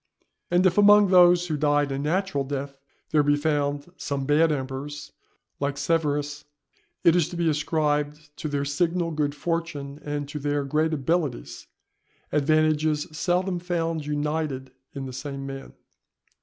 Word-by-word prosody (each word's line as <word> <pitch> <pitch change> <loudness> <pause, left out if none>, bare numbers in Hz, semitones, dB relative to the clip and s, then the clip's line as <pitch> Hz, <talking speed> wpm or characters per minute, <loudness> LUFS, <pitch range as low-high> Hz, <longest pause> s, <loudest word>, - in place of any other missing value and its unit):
And 175 +1 +3
if 185 +2 +4
among 205 -1 +7
those 175 -1 +6
who 160 -3 -2
died 145 -1 +1
a 135 - -2
natural 170 +1 0
death, 140 0 -4 0.4
there 155 - +4
be 145 0 +3
found 145 +1 -1
some 140 -1 -3
bad 155 +3 +4
emperors, 140 +1 -5 0.5
like 140 0 -2
Severus, 145 -3 -1 0.6
it 170 - +6
is 175 -4 +2
to 175 - -7
be 170 -1 +1
ascribed 150 -1 -1
to - - -4
their 140 -1 -1
signal 170 +3 0
good 150 -2 -1
fortune 150 -3 -3
and 145 -1 -3
to 150 - -5
their 145 0 -1
great 155 +3 0
abilities, 150 -2 -2 0.6
advantages 155 0 +2
seldom 180 +2 0
found 165 -3 -2
united 150 -3 -2 0.2
in 135 -1 -4
the 130 - -7
same 135 +1 -6
man. 135 0 -8
150 Hz, 145 wpm, -25 LUFS, 145-165 Hz, 0.6 s, among